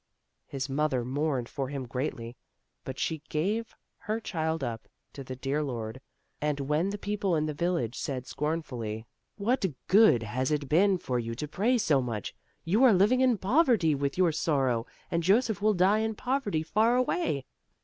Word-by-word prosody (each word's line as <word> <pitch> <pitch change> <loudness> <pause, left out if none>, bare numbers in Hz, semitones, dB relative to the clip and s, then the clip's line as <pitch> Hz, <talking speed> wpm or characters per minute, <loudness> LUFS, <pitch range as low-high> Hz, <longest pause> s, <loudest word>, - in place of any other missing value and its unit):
His 135 -1 -4
mother 135 -3 0
mourned 135 -2 -1
for 135 0 -4
him 140 -2 -4
greatly, 120 -2 -4 0.5
but 130 0 -6
she 160 -2 -2
gave 210 +9 -1 0.2
her 215 +2 -3
child 160 -6 -2
up 115 -2 -4 0.3
to 140 - -7
the 130 0 -6
dear 135 +4 -1
Lord, 120 -3 -4 0.4
and 150 -1 0
when 150 +7 0
the 205 - -3
people 200 -3 -1
in 155 -1 +1
the 155 - -2
village 145 -7 -1
said 130 -3 -4
scornfully: 125 -9 -3 0.3
"What 225 +5 0 0.2
good 195 - +6
has 130 +4 -1
it 150 -2 -1
been 190 +6 +4
for 125 -7 -2
you 115 0 -4
to 150 +5 -4
pray 220 - +1
so 150 - +2
much? 115 -5 -4 0.3
You 205 +10 +3
are 250 -4 +7
living 210 +7 +4
in 255 -3 +4
poverty 225 - +3
with 140 +1 -2
your 180 -3 +4
sor 150 -3 +1
row, 120 -2 0 0.2
and 170 - +1
Joseph 205 +4 +2
will 215 0 +3
die 190 +4 +4
in 220 0 -1
poverty 245 - -1
far 220 +8 +2
away." 250 - 0
155 Hz, 180 wpm, -29 LUFS, 130-205 Hz, 0.5 s, are